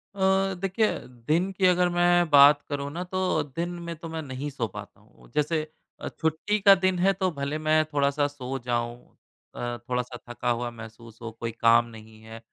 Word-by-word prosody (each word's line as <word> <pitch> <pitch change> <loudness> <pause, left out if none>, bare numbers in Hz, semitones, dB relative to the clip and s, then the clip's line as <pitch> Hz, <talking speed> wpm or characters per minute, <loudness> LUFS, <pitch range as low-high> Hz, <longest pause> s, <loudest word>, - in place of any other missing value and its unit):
अ, 190 0 +2
देखिए, 195 +3 +1 0.2
दिन 150 +10 -1
की 190 0 0
अगर 180 0 +3
मैं 175 -1 +3
बात 145 0 +7
करूँ 140 -1 -3
ना 175 +4 -4
तो 185 -2 -1
दिन 170 +1 -2 0.2
में 170 - -4
तो 165 +1 -9
मैं 160 0 -4
नहीं 135 +1 -5
सो 130 -5 -3
पाता 105 -1 -11
हूँ। 105 - -22
जैसे 155 +1 0 0.3
अ, - - -4
छुट्टी 160 +7 -1
का 200 0 +8
दिन 185 -1 0
है 195 +2 +4
तो 190 -1 0
भले 140 0 -3
मैं 155 0 +2
थोड़ा-सा 140 0 +1
सो 135 -2 -6
जाऊँ, 120 -1 -1 0.6
अ, 120 0 -4
थोड़ा-सा 125 0 -2
थका 120 0 -3
हुआ 120 0 -1
महसूस 115 0 -12
हो, 115 -1 -6
कोई 115 +1 -5
काम 115 +1 +4
नहीं 110 -1 -14
है 110 +1 -10
145 Hz, 190 wpm, -26 LUFS, 120-175 Hz, 0.6 s, का